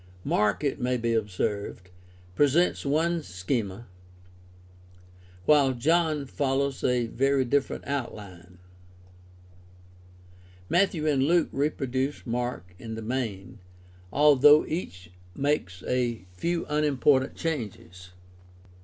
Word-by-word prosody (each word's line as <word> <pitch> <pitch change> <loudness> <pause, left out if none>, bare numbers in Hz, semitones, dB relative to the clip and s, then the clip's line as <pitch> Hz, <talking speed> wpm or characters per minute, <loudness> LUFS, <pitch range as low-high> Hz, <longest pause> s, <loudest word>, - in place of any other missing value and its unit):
Mark, 105 +6 +1
it 140 -1 -1
may 125 0 +1
be 115 0 -1
observed, 100 -3 -3 0.4
presents 145 - +2
one 165 +4 +1
schema, 95 +2 -3 1.6
while 140 -3 +4
John 155 +3 +1
follows 135 0 -1
a 125 -1 +2
very 135 +3 +1
different 140 +2 -1
outline. 100 -10 -6 2.1
Matthew 175 -4 +2
and 145 -3 +2
Luke 165 +4 +3
reproduce 135 -1 -2
Mark 120 -7 -3
in 110 +2 -6
the 110 - -6
main, 110 -5 -4 0.5
although 150 +1 +6
each 90 - -6 0.2
makes 135 -11 -1
a 120 -5 -1
few 170 - -2
unimportant 145 -3 +2
changes. 105 - -5
130 Hz, 95 wpm, -27 LUFS, 110-145 Hz, 2.1 s, although